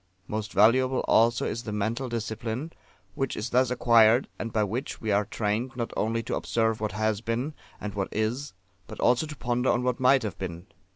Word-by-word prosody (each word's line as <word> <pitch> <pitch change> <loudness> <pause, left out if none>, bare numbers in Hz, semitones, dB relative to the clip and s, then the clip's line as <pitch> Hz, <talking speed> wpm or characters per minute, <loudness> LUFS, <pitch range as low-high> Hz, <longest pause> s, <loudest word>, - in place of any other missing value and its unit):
Most 110 -1 -4
valuable 130 +6 +4
also 115 +2 +3
is 115 - -2
the 110 - -6
mental 115 +5 -2
discipline 115 +5 -4 0.4
which 135 -1 -2
is 110 +3 -4
thus 125 0 +3
acquired, 115 -1 +5
and 115 - -4
by 110 -1 +1
which 115 +7 -3
we 110 - -2
are 100 +1 +2
trained 115 +5 -2
not 120 -2 -3
only 115 +1 0
to - - -4
observe 110 -1 0
what 105 -3 -2
has 110 0 0
been, 120 +6 -2 0.3
and 105 -1 -5
what 100 -2 -2
is, 115 +6 -2 0.3
but - - -10
also 125 +6 +3
to 150 - -7
ponder 125 0 0
on 120 - +2
what 125 -1 0
might 130 0 +4
have 105 - -5
been. 85 -2 -5
115 Hz, 195 wpm, -27 LUFS, 110-125 Hz, 0.4 s, acquired